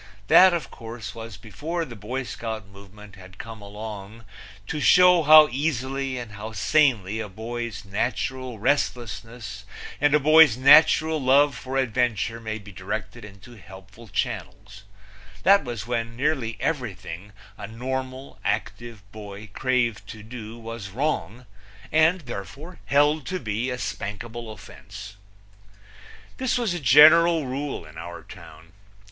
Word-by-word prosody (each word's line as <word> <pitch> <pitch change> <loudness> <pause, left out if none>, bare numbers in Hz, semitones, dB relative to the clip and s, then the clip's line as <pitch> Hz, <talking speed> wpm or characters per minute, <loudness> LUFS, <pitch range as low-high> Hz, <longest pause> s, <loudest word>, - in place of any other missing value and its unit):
That, 185 0 +8
of 170 -7 -3
course, 115 0 -8
was 115 -3 -9
before 150 - -5
the 120 - -10
Boy 125 +6 -4
Scout 110 -3 -6
movement 100 +1 -15
had 95 0 -14
come 115 -1 -9
along 105 +1 -9 0.4
to 150 - -4
show 180 +2 +6
how 155 0 +8
easily 135 -1 -2
and 120 -3 -7
how 105 +2 -8
sanely 110 -9 +2
a 110 -2 -5
boy's 110 0 -6
natural 120 +4 -3
restlessness 115 -3 -2 0.4
and 145 +1 +3
a - - +4
boy's 155 -4 +6
natural 155 +3 +5
love 140 +2 +4
for 130 +2 -5
adventure 120 -3 0
may 110 -1 -5
be 100 -1 -12
directed 100 +5 -6
into 105 +3 -13
helpful 95 +3 -14
channels; 100 +1 -5 0.6
that 195 -1 +5
was 120 -6 -6
when 115 -1 -3
nearly 130 -5 -1
everything 100 - -4 0.2
a 100 -1 -8
normal, 130 +3 -6
active 115 -3 -4
boy 105 -1 -10
craved 125 -4 -1
to 105 -1 -10
do 115 0 -9
was 115 -3 -8
wrong 125 -1 -3 0.5
and, 160 +3 +3
therefore, 135 - -9
held 145 +1 +2
to 185 0 -3
be 115 +2 -3
a 125 - -3
spankable 115 +1 -6
offense. 100 0 -11 1.2
This 260 -1 0
was 230 -7 -1
a 175 - -3
general 155 +4 +6
rule 135 - -4
in 80 +1 -12
our 85 +1 -8
town. 80 +1 -14
115 Hz, 135 wpm, -24 LUFS, 105-140 Hz, 1.2 s, That